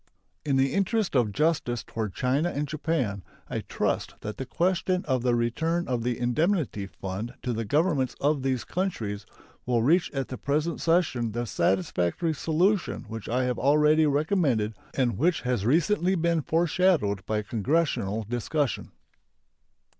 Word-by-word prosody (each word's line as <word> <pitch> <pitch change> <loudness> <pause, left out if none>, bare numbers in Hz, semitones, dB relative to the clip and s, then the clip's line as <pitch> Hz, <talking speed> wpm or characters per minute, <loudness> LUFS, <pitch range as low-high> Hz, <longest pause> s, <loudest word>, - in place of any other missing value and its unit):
In 145 -3 +1
the 135 0 +2
interest 200 -1 0
of 120 -5 +3
justice 150 -3 0
toward 110 -4 -4
China 140 +7 +1
and 145 -2 -2
Japan, 140 - -1 0.3
I - - -3
trust - - -2
that 105 - -5
the 130 - -5
question 185 +4 0
of 130 -4 0
the 120 -1 +2
return 160 +9 0
of 125 -2 -1
the 120 0 -1
indemnity 125 - 0
fund 100 +6 -6
to 125 - -1
the 115 0 -2
Governments 145 - +1
of 145 0 +1
those 130 -4 -1
countries 110 - -3 0.4
will 120 -2 +2
reach 165 +8 +3
at 135 -3 -3
the 130 - -6
present 150 +4 -1
session 150 -10 +1
the 120 +1 -2
satisfactory 95 - 0
solution 175 +7 +1
which 115 -2 -6
I 125 +2 +1
have 125 -1 -1
already 150 +3 +4
recommended, 145 - +1 0.2
and 125 -4 0
which 170 +3 +2
has 125 -5 -1
recently 180 - +2
been 170 -1 +1
foreshadowed 160 - +2
by 105 -1 0
Congressional 115 -2 0
discussion. 120 +5 -2
135 Hz, 150 wpm, -27 LUFS, 115-165 Hz, 0.4 s, already